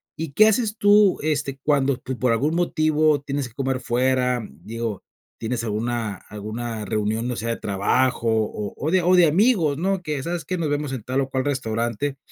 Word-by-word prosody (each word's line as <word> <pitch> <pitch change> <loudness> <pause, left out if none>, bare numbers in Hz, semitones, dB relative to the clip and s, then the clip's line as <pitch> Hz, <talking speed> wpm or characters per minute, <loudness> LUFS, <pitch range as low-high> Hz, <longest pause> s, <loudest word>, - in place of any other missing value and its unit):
¿Y 160 -3 -5
qué 215 +5 +6
haces 220 -1 +1
tú 205 -1 +5
este 145 -3 -1
cuando 140 -3 +2
tú, 130 0 -6
por 125 -2 +2
algún 145 +8 +1
motivo, 155 -3 +2
tienes 140 -2 -3
que 120 - -19
comer 130 -2 -1
fuera? 125 -1 +1
Digo, 115 -2 -5 0.4
¿tienes 115 0 -2
alguna 110 -1 -2
alguna 110 +2 -5
reunión, 110 +3 -1
o - - -3
sea, 115 +1 -3
de 115 - -1
trabajo 115 +5 0
o 105 -2 -1
o 155 +3 -2
de 185 -1 +4
o 180 +2 +4
de 175 -2 +7
amigos, 170 - +3
¿no? 190 +2 0
Que 150 -4 -3
sabes 170 +1 -3
que 185 - -2
nos 160 -3 -1
vemos 145 -1 -2
en 120 -5 -5
tal 130 +2 0
o 135 - -3
cual 130 +1 -1
restaurante, 125 +1 -2
135 Hz, 195 wpm, -23 LUFS, 115-155 Hz, 0.4 s, de